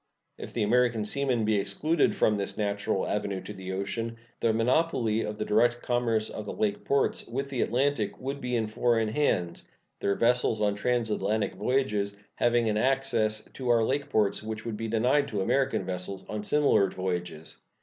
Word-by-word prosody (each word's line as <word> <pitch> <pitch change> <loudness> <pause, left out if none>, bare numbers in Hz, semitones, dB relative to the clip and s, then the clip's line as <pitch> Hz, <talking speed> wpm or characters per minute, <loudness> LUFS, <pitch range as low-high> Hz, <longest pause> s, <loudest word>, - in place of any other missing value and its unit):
If - - -7
the 115 - -1
American 115 0 +2
seamen 125 -1 0
be 110 -1 +2
excluded 140 +12 +1
from 110 - +3
this 100 -1 -3
natural 100 -2 -1
avenue 100 -2 -2
to - - -8
the 95 -1 -7
ocean, 115 +4 -3 0.2
the 115 - +2
monopoly 115 -1 +1
of 105 -1 -4
the 105 - -2
direct 120 +3 +2
commerce 115 -3 +1
of 105 - -7
the - - -4
lake 105 -1 -1
ports 140 0 +1
with 135 +4 -4
the 130 - -1
Atlantic 130 -2 0
would 135 +2 -4
be 125 0 -2
in 115 -2 +1
foreign 115 0 +1
hands, 90 -9 0 0.3
their 100 - +1
vessels 115 -1 +2
on 105 -1 +2
transatlantic 110 -1 0
voyages 105 -2 0 0.2
having 120 -1 +2
an 105 -1 +1
access 115 -4 +1
to 130 -2 -4
our 115 -1 +4
lake 140 +5 -1
ports 105 -2 +1
which 110 0 -6
would 115 -2 -3
be 115 +2 -4
denied 125 +6 +2
to 105 -7 -2
American 135 +7 +1
vessels 95 +1 -5
on 105 -1 -4
similar 140 -7 +3
voyages. 90 -3 -4
110 Hz, 180 wpm, -28 LUFS, 105-125 Hz, 0.3 s, our